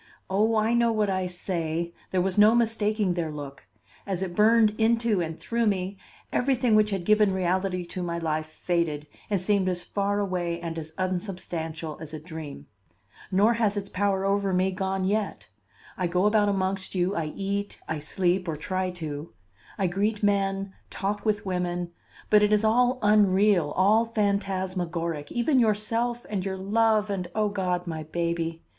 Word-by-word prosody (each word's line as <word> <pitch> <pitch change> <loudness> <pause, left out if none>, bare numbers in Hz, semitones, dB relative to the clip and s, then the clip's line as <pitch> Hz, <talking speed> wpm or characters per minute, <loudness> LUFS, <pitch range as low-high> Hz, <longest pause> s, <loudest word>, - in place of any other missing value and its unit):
Oh, 215 +4 +2
I 220 +2 +2
know 235 -1 +3
what 210 -3 +1
I 185 -1 -1
say! 170 -2 -3 0.2
There 185 -1 +1
was 190 -1 -1
no 210 +2 +6
mistaking 215 -4 +1
their 170 -2 -2
look. 140 -7 -8 0.4
As 190 -1 -1
it 180 -2 -4
burned 220 0 +5
into 230 -3 +2
and 160 -1 -4
through 235 -1 0
me, 190 -1 -1 0.4
everything 250 -3 +2
which 215 0 +5
had 195 -4 -3
given 215 0 +4
reality 185 0 0
to 180 +1 -6
my 170 -1 -2
life 155 -2 -2
faded 155 -2 -2 0.2
and 200 -2 +1
seemed 190 0 +1
as 175 -1 -2
far 200 0 -1
away 180 -4 -1
and 165 -1 -4
as 155 0 -8
unsubstantial 175 -4 -3
as 160 -1 -7
a - - -6
dream. 155 - -8 0.7
Nor 205 +5 +4
has 215 -3 +1
its 200 -1 -4
power 195 0 0
over 200 0 +1
me 185 +1 +2
gone 190 0 -2
yet. 195 - -2 0.5
I 180 - -1
go 180 +3 +1
about 210 -1 +4
amongst 190 -1 -1
you, 185 +2 +1
I 165 - -1
eat, 200 +1 -3
I 160 - -2
sleep, 180 +4 0
or 160 - -1
try 185 +4 -2
to; 160 -3 -6 0.4
I 195 - +1
greet 205 +4 0
men, 195 -1 +1 0.2
talk 205 +1 -3
with 210 -1 0
women, 175 -2 -2 0.4
but 210 -1 +7
it 210 0 +3
is 210 0 +3
all 245 +3 +3
unreal, 205 -5 +4
all 210 +5 +4
phantasmagoric, 185 -7 -2
even 255 +3 +2
yourself 230 +2 0
and 200 -3 -2
your 190 0 -3
love 215 +1 +2
and, 180 -3 -3
O 215 -1 +2
God, 180 -3 -1
my 160 -2 -4
baby! 165 +1 -2
190 Hz, 170 wpm, -26 LUFS, 175-210 Hz, 0.7 s, but